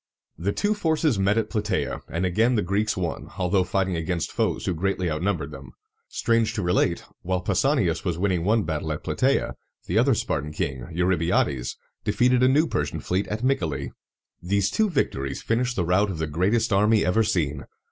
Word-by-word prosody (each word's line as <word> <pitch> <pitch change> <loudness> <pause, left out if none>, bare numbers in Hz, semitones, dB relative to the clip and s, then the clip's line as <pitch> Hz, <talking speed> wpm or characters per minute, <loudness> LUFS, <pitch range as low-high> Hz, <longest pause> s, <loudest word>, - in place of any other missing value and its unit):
The 95 +4 -1
two 205 - +1
forces 160 - +1
met 100 +3 +2
at 110 -2 -1
Pla 110 - 0
tæ´a, 105 +1 -2
and 85 +3 -1
again 110 +7 +2
the 105 - +1
Greeks 100 +4 0
won, 85 -3 -3
although 95 +1 +2
fighting 95 0 0
against 85 +1 -2
foes - - -1
who 90 - 0
greatly 95 0 -1
outnumbered 75 -2 -1
them. 65 -4 -10 0.3
Strange 115 -1 +1
to 105 - -1
relate, 90 -1 +1 0.2
while 90 0 -1
Pausanias 100 - +1
was 85 -4 -1
winning 90 -2 0
one 110 +3 +2
battle 80 -1 -3
at 75 - -7
Platæa, - - +1 0.3
the 95 +6 +1
other 130 +1 +4
Spartan 75 -6 -2
king, 65 -4 -3
Eurybiades, 85 -7 0 0.3
defeated 120 +4 +2
a 130 - +6
new 145 +5 +4
Persian 75 - -2
fleet 95 +3 -1
at 110 +3 -4
Myc´a 130 -11 +1
le. 70 - -4 0.5
These 100 +2 +1
two 220 -1 +2
victories 70 - -2
finished 120 +2 0
the 90 - 0
rout 95 +4 +2
of 95 - -4
the 80 - -1
greatest 100 +9 +1
army 105 0 +4
ever 90 +6 +3
seen. 80 -9 -1
95 Hz, 190 wpm, -25 LUFS, 85-110 Hz, 0.5 s, a